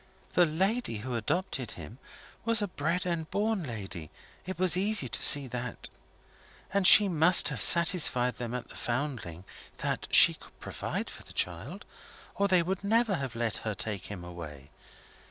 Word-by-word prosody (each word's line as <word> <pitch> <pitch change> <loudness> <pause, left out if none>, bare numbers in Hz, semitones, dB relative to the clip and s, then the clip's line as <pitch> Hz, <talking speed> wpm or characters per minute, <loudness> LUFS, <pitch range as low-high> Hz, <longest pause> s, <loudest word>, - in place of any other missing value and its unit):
The, 175 -1 +3
lady 190 - -1
who 130 - -5
adopted 130 - -3
him 95 - -12 0.4
was 230 -1 +3
a 205 - -1
bred 175 +1 -3
and 170 -3 -3
born 215 0 -1
lady 95 - -8 0.4
it 185 -2 -6
was 180 -2 +4
easy 200 -6 +1
to 120 - -4
see 145 -1 +3
that. 125 0 -7 0.8
And 195 -2 +3
she 205 +1 +9
must 170 -1 +5
have 130 -7 -5
satisfied 145 - +3
them 120 0 -5
at 125 -2 -7
the - - -14
Foundling 120 - -5 0.3
that - - -4
she - - +7
could - - -18
provide - - -5
for - - -13
the - - -14
child, - - -4 0.5
or 200 - 0
they 185 -3 +3
would 190 +3 -4
never 225 +1 +1
have 135 -4 -6
let 115 -2 -2
her 110 -2 -5
take 100 -1 -6
him 100 -4 -9
away. 75 -5 -11
145 Hz, 170 wpm, -28 LUFS, 115-185 Hz, 0.8 s, she